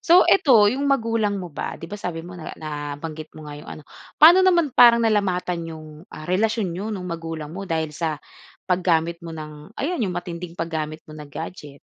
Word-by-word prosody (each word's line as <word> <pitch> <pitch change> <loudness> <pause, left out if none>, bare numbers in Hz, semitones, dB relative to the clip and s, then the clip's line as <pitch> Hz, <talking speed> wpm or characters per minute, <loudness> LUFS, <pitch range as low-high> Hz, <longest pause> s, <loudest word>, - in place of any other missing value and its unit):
So 350 +2 +6
'eto, 235 - +5
'yong 280 +2 -1
magulang 225 -6 +1
mo 180 -4 -6
ba, - - -4
'di - - -10
ba, 205 +5 -7
sabi 165 -3 -4
mo 180 - -9
na 175 -3 -8
nabanggit 150 +1 -6
mo 155 - -10
nga 145 0 -8
'yong - - -13
ano, 155 - -9 0.3
pa'no 340 +4 +9
naman 345 -6 +3
parang 235 -2 +7
nalamatan 180 -5 0
'yong, 155 -1 -9 0.2
ah, 155 - -10
relasyon 205 +1 0
niyo 195 +5 -4
'nong 195 -4 -4
magulang 165 -3 -5
mo 195 +2 -7
dahil 160 -2 -1
sa 160 0 -2 0.5
paggamit 170 -2 +1
mo 165 -2 -8
ng 150 +5 -10
ayan, 330 +2 -2
'yong 185 -6 -1
matinding 175 -1 -6
paggamit 160 -1 -4
mo 155 - -13
ng 150 -1 -10
gadget? 150 -1 -8
175 Hz, 195 wpm, -23 LUFS, 155-210 Hz, 0.5 s, pa'no